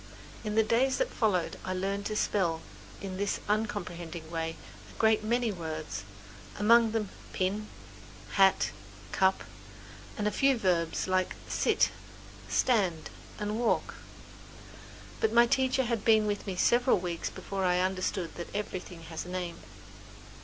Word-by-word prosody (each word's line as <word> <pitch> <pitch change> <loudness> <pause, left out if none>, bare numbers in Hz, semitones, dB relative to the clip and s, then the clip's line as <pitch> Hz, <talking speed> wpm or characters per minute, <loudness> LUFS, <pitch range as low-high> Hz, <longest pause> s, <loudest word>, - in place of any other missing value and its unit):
In 210 -1 -2
the 220 - +5
days 245 +5 +2
that - - 0
followed 190 -7 0
I 185 - -2
learned 195 +2 -2
to 215 - -3
spell 175 -6 +1 0.4
in 190 -1 -5
this 200 +1 -1
uncomprehending 175 -6 -3
way 165 -1 -2 0.3
a - - -14
great 220 -1 +3
many 235 +1 +1
words, 155 - -5 0.5
among 230 +2 +6
them 215 -3 -1 0.2
pin, 200 +3 -1 0.6
hat, 195 -1 +4 0.4
cup 190 0 +2 0.7
and 210 -1 0
a - - +1
few 270 +2 +3
verbs 175 -6 +1
like 185 0 +1
sit, - - +2 0.6
stand 185 -10 +1 0.3
and 210 +1 -2
walk. 240 - +1 1.3
But 220 - +2
my 235 0 +7
teacher 260 +2 +2
had 235 -3 -1
been 220 -2 +5
with 205 0 -2
me 190 - -2
several 245 +6 +4
weeks 175 -2 -3
before 195 -1 -4
I 180 -1 +3
understood 185 -2 -1
that 170 - -6
everything 185 -4 -5
has 160 0 -5
a - - -8
name. 180 -2 -4
200 Hz, 140 wpm, -30 LUFS, 180-220 Hz, 1.3 s, my